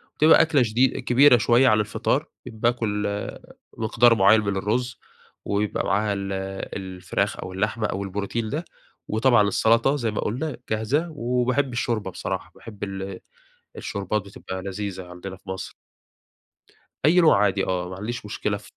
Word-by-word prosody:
وتبقى 155 +2 +6
أكلة 150 -5 +3
شدي 120 +4 +3
كبيرة 125 +1 +6
شوية 120 +4 +4
عن 110 -3 +4
الفطار، 105 - 0 0.2
باكل 110 -2 -1 0.7
مقدار 115 +1 +4
معين 100 +2 +5
من 100 -2 -2
الرز 120 +5 -1 0.5
ويبقى 100 +1 -1
معاها 100 +1 +1
ال 100 -1 -4 0.4
الفراخ 95 -2 -3
أو 95 - -6
اللحمة 110 +3 -1
أو 100 - -3
البروتين 105 +3 -3
ده، 160 +4 -3 0.4
وطبعًا 110 -1 +3
السلطة 115 +6 +3
زي 115 -6 -1
ما 105 - -2
قلنا 135 +8 -3
جاهزة 120 +10 0
و 125 -5 -1
وباحب 130 +1 0
الشوربة 110 -5 -2
بصراحة، - - -5
باحب 105 -3 -10
ال 95 -1 -5 0.6
الشوربات، 100 +2 -2
بتبقى 95 -1 -8
لذيذة 100 -1 -5
عندنا 90 +2 -8
في 95 0 -15
مصر. 95 0 -5 1.3
أي 180 +4 +6
نوع 105 -11 +5
عادي 100 -1 +1
آه، 90 -1 -2
ما 90 - -7
عنديش 115 +3 -5
مشكلة 105 0 -2
في 105 - -16
105 Hz, 150 wpm, -24 LUFS, 100-120 Hz, 1.3 s, وتبقى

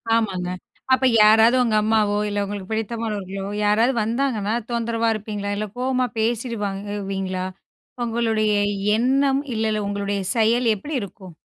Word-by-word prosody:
ஆமாங்க. 190 -6 -1 0.4
அப்ப 260 0 +3 0.2
யாராவது 220 +3 +6
உங்க 225 -3 +1
அம்மாவோ, 215 -1 +2
இல்ல 205 0 -1
உங்களுக்கு 200 -1 -6
பிடித்தமானவர்களோ, 210 -3 -3 0.2
யாராவது 225 +5 +3
வந்தாங்கன்னா, 230 -3 -1 0.2
தொந்தரவா 230 -1 0
இருப்பீங்களா, 205 -1 -4
இல்ல 215 +1 -2
கோவமா 255 0 0
பேசிடுவீங்களா? 205 -5 -2 0.6
உங்களுடைய 225 -2 +1 0.4
எண்ணம், 270 +3 +2
இல்ல 220 0 0
இல்ல 210 -1 -1
உங்களுடைய 200 0 -2 0.2
செயல் 230 +2 +3
எப்படி 295 +10 -7
இருக்கும்? 190 -2 -10
215 Hz, 120 wpm, -22 LUFS, 200-235 Hz, 0.6 s, யாராவது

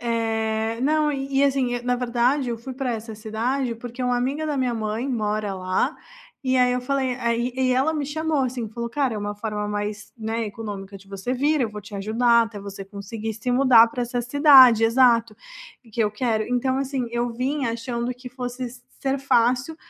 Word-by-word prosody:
Eh, 225 -1 -1
não 300 +3 +2
e 270 0 -2
e, - - +5
assim, 265 -3 +1
e, 245 - -3
na 250 0 0
verdade, 245 +2 +1
eu 235 - -2
fui 260 +3 -7
pra 260 -1 -2
essa 225 0 -6
cidade, 235 +4 -2
porque 240 +2 -9
uma 250 0 +1
amiga 275 +6 -1
da 300 -2 -1
minha 255 -2 0
mãe 220 +3 -2
mora 215 -4 -1
lá, 185 0 0 0.5
e 260 -1 +1
aí 250 0 +4
eu 250 - 0
falei 260 -1 -1
aí 235 0 -1
e 260 - 0
e - - +4
ela 270 +5 +2
me 295 -3 -2
chamou, 310 0 0
assim, 245 -3 -3
falou: 235 +2 -5
"Cara, 260 -1 0
é - - -3
uma 205 0 -3
forma 210 0 -3
mais, 205 0 -4
né, 225 0 -2
econômica 205 -3 -7
de 195 0 -17
você 195 +5 -4
vir, 290 +3 +1
eu 235 - +1
vou 210 -1 -8
te 205 0 -9
ajudar 235 +4 +3
até 215 -3 -8
você 200 0 -8
conseguir 210 +3 -6
se 225 +3 -3
mudar 245 -3 +6
pra 245 +2 -3
essa 245 0 -2
cidade" 260 -3 +7
exato, 230 -2 +4 0.5
e 230 - -19
que 225 - -3
eu 210 - 0
quero. 220 -1 0
Então, 255 +2 0
assim, 270 -2 -2
eu 240 0 0
vinha 260 +1 -1
achando 235 +1 -3
que 250 +1 -10
fosse 250 0 -5
s 245 0 -9 0.2
ser 275 0 0
fácil 255 +3 +1
240 Hz, 210 wpm, -23 LUFS, 220-260 Hz, 0.5 s, cidade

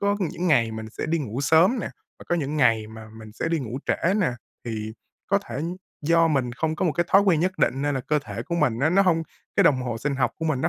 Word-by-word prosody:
có 200 0 +1
những 180 0 -2
ngày 120 -9 +3
mình 110 0 -7
sẽ - - -5
đi 165 +1 0
ngủ 130 -3 -4
sớm 160 - +4
nè, - - -4 0.3
và - - -12
có - - +2
những 150 -1 -2
ngày 115 -5 +3
mà 110 0 -11
mình 110 -1 -11
sẽ 140 - -3
đi 165 0 0
ngủ 125 -2 -5
trễ 185 +3 +1
nè. 195 -8 +2 0.3
Thì 110 -2 -4 0.3
có 200 - +3
thể 130 - -8 0.5
do 165 +2 +4
mình 130 -5 0
không 160 +5 -2
có 190 - -1
một 160 - +1
cái 175 - 0
thói 195 - +6
quen 180 -6 +3
nhất 185 +2 -1
định 135 +2 +1
nên 145 0 0
là 135 - -1
cơ 150 +4 0
thể - - -5
của 170 - -4
mình 145 -9 +1
á, 145 +5 +2
nó 195 +3 +5
hông 170 -4 +2 0.3
cái - - +5
đồng 130 -3 +4
hồ 120 -2 -3
sinh 140 +4 -2
học 130 - +1
của 160 - -3
mình 155 -5 0
nó - - +1
150 Hz, 280 wpm, -24 LUFS, 120-170 Hz, 0.5 s, thói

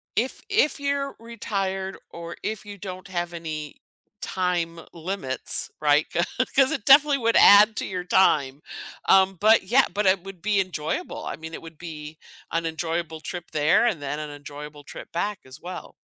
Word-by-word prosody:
If 245 +4 -1
if 395 -8 +2
you're 280 0 -1
retired 195 -4 -3
or 170 0 -8
if 215 0 -4
you 205 -1 -9
don't 185 -1 -8
have 175 -2 -3
any 155 -3 -6 0.4
time 175 -3 -1
limits, 165 -7 -4
right? 150 0 +4
'Cau 170 - +1 0.3
'cause 270 -1 +5
it 205 - -3
definitely 285 +1 +7
would 230 -2 +2
add 210 +2 +8
to - - -1
your 180 -2 -4
time. 145 -6 +2 0.5
Um, 190 0 +5
but 215 0 +5
yeah, 245 +8 +4
but 205 0 -1
it 185 -1 +4
would 195 -3 -10
be 210 0 +1
enjoyable. 170 -4 -3
I - - -5
mean, 160 +1 -9
it - - -7
would 165 -1 -12
be 155 -2 -8 0.3
an 165 0 -1
enjoyable 160 0 -3
trip 175 +1 -7
there 155 +8 +3
and 205 -11 0
then 145 +1 -3
an 150 -1 -5
enjoyable 145 0 -9
trip - - -10
back 195 +4 -2
as 130 +3 -12
well. 180 +1 -8
180 Hz, 175 wpm, -25 LUFS, 160-205 Hz, 0.5 s, add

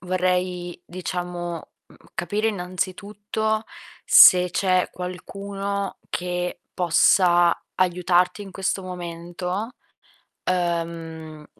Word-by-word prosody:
vorrei, 180 -1 -1
diciamo, 175 -2 -5 0.2
mhmm, - - -18 0.2
capire 210 +5 -1
innanzitutto 205 +3 -2 0.4
se 180 0 +8
c'è 185 0 +2
qualcuno 195 +2 -5
che 180 0 -3
possa 175 0 +4
aiutarti 180 +2 +2
in 195 -2 -10
questo 195 0 -2
momento, 180 +3 -5 0.8
uhm, 165 -3 -3
180 Hz, 80 wpm, -24 LUFS, 175-195 Hz, 0.8 s, se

